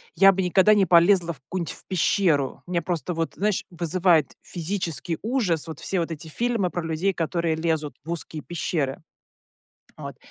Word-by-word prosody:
я 195 0 +7
бы 190 0 -1
никогда 190 +4 +5
не 195 -2 +4
полезла 170 0 +4
в 140 - -15
какую-нибудь 170 +5 -4
в - - -16
пещеру, 170 -6 +1
у - - -9
меня 170 - +1
просто 175 0 -2
вот, 165 0 -2
знаешь, 205 0 0
вызывает 170 -1 +2
физический 170 -2 -3
ужас 210 - 0
вот 160 -1 -7
все 190 - -2
вот 165 0 -2
эти 160 +1 -7
фильмы 225 +2 0
про 175 -1 -4
людей, 165 +4 0
которые 165 -1 -1
лезут 160 -2 -1
в 165 - -5
узкие 160 -3 -5
пещеры. 155 -5 -2 1.0
Вот, - - -8
170 Hz, 175 wpm, -24 LUFS, 160-190 Hz, 1.0 s, я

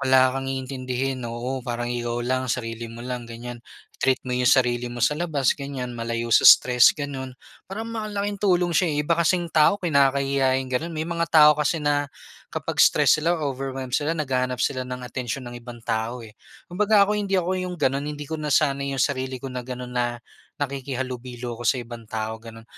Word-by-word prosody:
wala 130 -1 +4
kang 135 0 -3
iintindihin, 130 0 -3
oo, 125 +3 -4
parang 120 0 -3
ikaw 120 0 -2
lang, 130 0 -1
sarili 115 -1 -3
mo 115 +1 -9
lang 125 -2 -5
ganiyan. 120 +1 -8 0.4
Treat 130 -1 +3
mo 125 - -3
'yung 125 0 +2
sarili 125 -2 +3
mo 120 - -8
sa 150 - +3
labas 150 -5 +1
ganiyan, 135 -3 -5
malayo 115 0 -3
sa - - +7
stress 125 +2 +7
gano'n. 135 -3 -5 0.3
Parang 215 +4 -5
malaking 205 -3 -3
tulong 180 -3 +2
siya, 170 +1 +3
eh, - - -1
'yung 150 - 0
iba 170 - +1
kasing 170 0 +1
tao 155 +6 +5
kinakahiya 140 -5 +2
'yung 130 -1 -4
gano'n. 160 +7 -1
May 160 -1 -3
mga 170 0 -2
tao 150 -1 +7
kasi 150 +1 -1
na 145 -1 +1 0.4
kapag - - -2
stress 155 - +5
sila 170 +2 +1
o 145 -4 -2
overwhelmed 130 -1 -5
sila 155 +4 0
naghahanap 130 -4 -1
sila 130 0 -1
ng 125 0 -5
atensyon 125 +1 -4
ng 120 0 -8
ibang 120 -1 -11
tao, 115 +1 -2
eh. 105 - -13 0.3
Kumbaga 205 +3 +3
ako 210 - -1
hindi 195 -1 0
ako 185 0 0
'yung 180 -1 -4
gano'n 140 0 0
hindi 150 0 -5
ko 160 +2 -5
nasanay 140 -2 +1
'yung 125 - +3
sarili 130 -2 -2
ko 130 +1 -7
na 125 - -3
gano'n 125 0 -7
na 120 -1 -1 0.4
nakikihalubilo 125 -3 -5
ako 120 - 0
sa - - +3
ibang 120 -2 -8
tao 110 0 -4
gano'n. 115 0 -12
130 Hz, 200 wpm, -24 LUFS, 120-150 Hz, 0.4 s, sa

